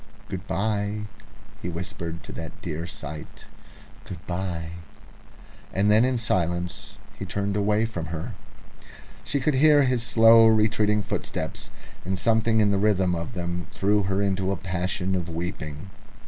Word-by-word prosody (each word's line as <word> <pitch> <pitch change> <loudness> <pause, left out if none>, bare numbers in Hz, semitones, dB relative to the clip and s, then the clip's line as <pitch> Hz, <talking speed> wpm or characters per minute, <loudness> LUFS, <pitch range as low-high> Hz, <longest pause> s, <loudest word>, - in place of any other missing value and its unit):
"Good 95 -1 -5
bye!" 105 0 -1 0.6
he 90 - -3
whispered 85 -1 -5
at - - -7
that 80 -1 -8
dear 85 0 -4
sight, 75 -2 -8 0.6
"good 85 -3 -8
bye!" 85 -2 -3 1.0
And 100 +2 +2
then 110 +2 +6
in 130 0 +2
silence 90 -6 -1 0.2
he - - -4
turned 100 0 -2
away 105 +2 +2
from 90 -7 -4
her. 80 -1 -5 0.9
She 140 - 0
could 145 +3 +1
hear 145 +1 +6
his 125 -2 +2
slow 115 0 +7
retreating 110 -1 +3
footsteps, - - -4 0.3
and 95 +1 -2
something 110 +2 +3
in 105 -1 +3
the 100 - +2
rhythm 95 -3 +2
of 85 +6 -4
them 90 -2 -3
threw 105 +2 +2
her 95 +1 0
into 95 -1 0
a 100 - -1
passion 95 +1 -2
of 90 -2 -2
weeping. 80 0 -5
95 Hz, 145 wpm, -25 LUFS, 85-110 Hz, 1.0 s, slow